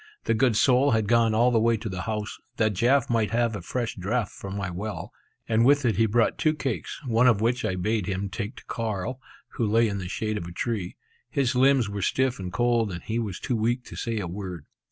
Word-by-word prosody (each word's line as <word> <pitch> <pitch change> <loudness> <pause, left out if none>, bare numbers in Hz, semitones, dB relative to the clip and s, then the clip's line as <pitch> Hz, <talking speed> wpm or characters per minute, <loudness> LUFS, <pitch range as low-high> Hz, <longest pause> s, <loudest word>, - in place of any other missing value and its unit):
The - - +1
good 115 0 +2
soul 130 +4 +4
had 110 -1 +2
gone 115 -1 +3
all 120 +3 +4
the 115 - +3
way 115 +1 +3
to 110 +1 -6
the 95 -2 -4
house, 105 0 -4 0.2
that 110 -2 +2
Jaf 125 +7 +3
might 115 -3 +1
have 115 -1 +1
a 100 - -5
fresh 120 +6 -3
draught 105 +3 -1
from 100 0 -7
my 100 -3 -3
well; 105 +5 -5 0.4
and 110 0 +3
with 140 +2 +4
it 110 -5 +2
he 115 0 +4
brought 115 +2 +1
two 155 0 +2
cakes, 135 -6 -4
one 120 0 +3
of 115 -5 +4
which 120 +4 +1
I 95 - 0
bade 105 +1 -1
him 95 +1 -2
take 100 +2 -5
to - - -13
Carl, 115 +3 -3 0.3
who 115 - -1
lay 115 +2 +3
in 100 -2 -3
the 90 -1 -5
shade 110 +1 -2
of 85 - -7
a - - -8
tree. 100 0 -3 0.3
His 135 -2 +1
limbs 130 -2 +4
were 100 0 -4
stiff 130 +4 +1
and 90 -2 -5
cold, 120 -1 +1
and 85 -1 -6
he 115 +1 -2
was 105 -6 -4
too 125 - -2
weak 120 +3 0
to - - -11
say 115 -1 -3
a 105 - -2
word. 90 -3 -6
110 Hz, 240 wpm, -26 LUFS, 100-120 Hz, 0.4 s, soul